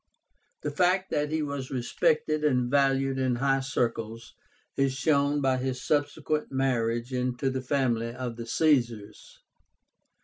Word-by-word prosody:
The 150 - -2
fact 185 +4 +1
that 150 0 0
he 155 0 -1
was 140 -3 -4
respected 155 - 0
and 125 -4 +1
valued 135 -1 +2
in 130 -2 +1
high 135 +2 +2
circles 115 -3 -3 0.4
is 135 -1 +1
shown 145 0 +2
by 130 -1 +2
his 130 0 -2
subsequent 150 +1 -1
marriage 120 -2 0
into 125 +1 -1
the 130 0 -3
family 125 -3 0
of 125 -1 -5
the 115 0 -7
Caesars. 120 -8 0
135 Hz, 135 wpm, -27 LUFS, 125-145 Hz, 0.4 s, valued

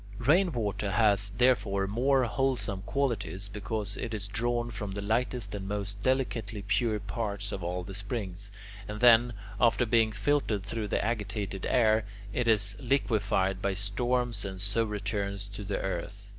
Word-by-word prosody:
Rainwater 120 - +1
has, 100 -1 +4
therefore, 105 -3 +2
more 130 +6 +2
wholesome 120 -5 0
qualities, 110 -8 -1
because 105 +1 -3
it 115 -2 -3
is 100 -2 -2
drawn 120 +2 -1
from 105 -3 -4
the 100 - -4
lightest 115 0 -1
and 100 -1 -4
most 100 0 -3
delicately 115 -5 0
pure 110 +1 +1
parts 100 0 -4
of 95 - -4
all 90 +1 -2
the 95 - -8
springs, 100 -1 -4 0.4
and 105 0 -5
then, 120 0 +7 0.3
after 120 +2 +4
being 115 -1 +3
filtered 110 -2 0
through 105 +2 -3
the 105 - 0
agitated 105 -3 -2
air, 110 -3 +4 0.3
it 125 -2 0
is 105 -3 +3
liquefied 105 -8 +1
by 100 -1 0
storms 120 +2 0
and 95 -2 -5
so 100 +4 +1
returns 100 -2 -3
to 100 +1 -7
the 100 0 -2
earth. 95 +2 -4
105 Hz, 155 wpm, -29 LUFS, 100-120 Hz, 0.4 s, then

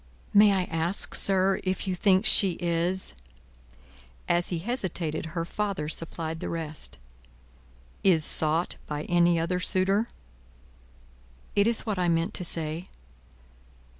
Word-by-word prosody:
"May 205 0 +6
I 190 -2 +1
ask, 165 +2 +1
sir, 190 0 +2
if 185 +1 -3
you 185 - 0
think 190 +2 +2
she 200 -4 +5
is 175 +2 -1 0.6
" - - -27 0.5
As 175 0 +2
he 175 - -2
hesitated, 170 -6 -3
her 165 - -1
father 200 -5 -3
supplied 160 0 -3
the - - -5
rest. 160 -2 -4 1.1
"Is 165 -6 +4
sought 160 +2 +3
by 150 0 -4
any 175 -1 +2
other 170 +2 -1
suitor?" 195 +4 0 1.5
"It 200 +1 +3
is 230 -1 0
what 210 -4 -2
I 175 -1 +1
meant 165 +3 0
to 180 - -2
say." 165 +1 -1
175 Hz, 135 wpm, -26 LUFS, 165-195 Hz, 1.5 s, May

